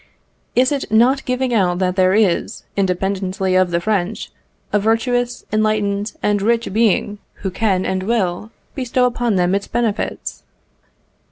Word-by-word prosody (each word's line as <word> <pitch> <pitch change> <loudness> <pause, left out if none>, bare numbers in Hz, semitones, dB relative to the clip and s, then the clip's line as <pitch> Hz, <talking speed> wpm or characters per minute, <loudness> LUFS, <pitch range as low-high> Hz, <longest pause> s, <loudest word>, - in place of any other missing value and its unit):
Is 255 +2 +3
it 280 -6 -3
not 250 +5 +3
giving 250 0 -1
out 180 -5 +2
that 180 -1 0
there 185 0 +3
is, 205 -6 +1
independently 190 0 -1
of 185 -1 +3
the 170 0 0
French, 200 +1 -2 0.4
a 210 - +4
virtuous, 245 +3 0
enlightened, 210 -1 0
and 205 -1 +1
rich 230 0 0
being, 210 -2 +1 0.3
who 190 - 0
can 190 -2 0
and 190 0 -1
will 200 -2 -1 0.2
bestow 255 -1 0
upon 240 -3 0
them 180 0 +2
its 200 0 -1
benefits? 230 -3 -2
210 Hz, 145 wpm, -19 LUFS, 190-235 Hz, 0.4 s, a